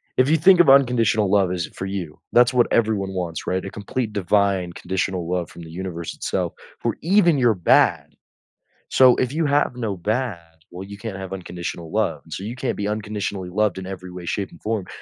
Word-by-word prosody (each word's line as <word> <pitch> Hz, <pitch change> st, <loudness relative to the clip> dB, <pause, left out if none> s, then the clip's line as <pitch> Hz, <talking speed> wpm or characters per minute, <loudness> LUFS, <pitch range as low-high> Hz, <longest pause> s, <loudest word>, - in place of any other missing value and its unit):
if 130 Hz, +2 st, +3 dB
you 160 Hz, -, +4 dB
think 180 Hz, +3 st, +6 dB
of 150 Hz, -, +4 dB
unconditional 115 Hz, -7 st, +4 dB
love 100 Hz, -3 st, +3 dB
is 85 Hz, -2 st, -2 dB
for 95 Hz, -, -5 dB
you, 95 Hz, -6 st, -5 dB
that's 120 Hz, +1 st, +5 dB
what 120 Hz, -1 st, +4 dB
everyone 105 Hz, -4 st, +1 dB
wants, 85 Hz, -3 st, -4 dB
right? 95 Hz, 0 st, -1 dB
A 95 Hz, -, -5 dB
complete, 110 Hz, +2 st, -4 dB
divine, 100 Hz, -2 st, +1 dB
conditional 90 Hz, -1 st, -3 dB
love 90 Hz, -2 st, -1 dB
from 85 Hz, -, -12 dB
the 80 Hz, -1 st, -10 dB
universe 85 Hz, -1 st, -5 dB
itself, -, -, -2 dB, 0.3 s
for -, -, -1 dB
even 175 Hz, -3 st, +4 dB
your 120 Hz, -3 st, +4 dB
bad. 90 Hz, -4 st, +2 dB, 0.8 s
So, 130 Hz, -2 st, +6 dB
if 130 Hz, +1 st, -1 dB
you 160 Hz, 0 st, 0 dB
have 145 Hz, -3 st, +1 dB
no 110 Hz, -5 st, -3 dB
bad, 110 Hz, +2 st, -1 dB, 0.3 s
well, 90 Hz, +2 st, -8 dB
you 100 Hz, 0 st, -10 dB
can't 110 Hz, -4 st, -6 dB
have 95 Hz, 0 st, -7 dB
unconditional 85 Hz, -3 st, -6 dB
love -, -, 0 dB
and -, -, -17 dB
so, 95 Hz, -, -5 dB
you 120 Hz, +4 st, -5 dB
can't 130 Hz, -, -2 dB
be 105 Hz, 0 st, -2 dB
unconditionally 105 Hz, -3 st, -3 dB
loved 105 Hz, +2 st, +1 dB
in 95 Hz, -, -6 dB
every 95 Hz, -1 st, -7 dB
way, 90 Hz, -1 st, -8 dB
shape, 100 Hz, +3 st, -3 dB
and 85 Hz, -, -17 dB
form 110 Hz, -4 st, -2 dB
100 Hz, 210 wpm, -22 LUFS, 90-120 Hz, 0.8 s, think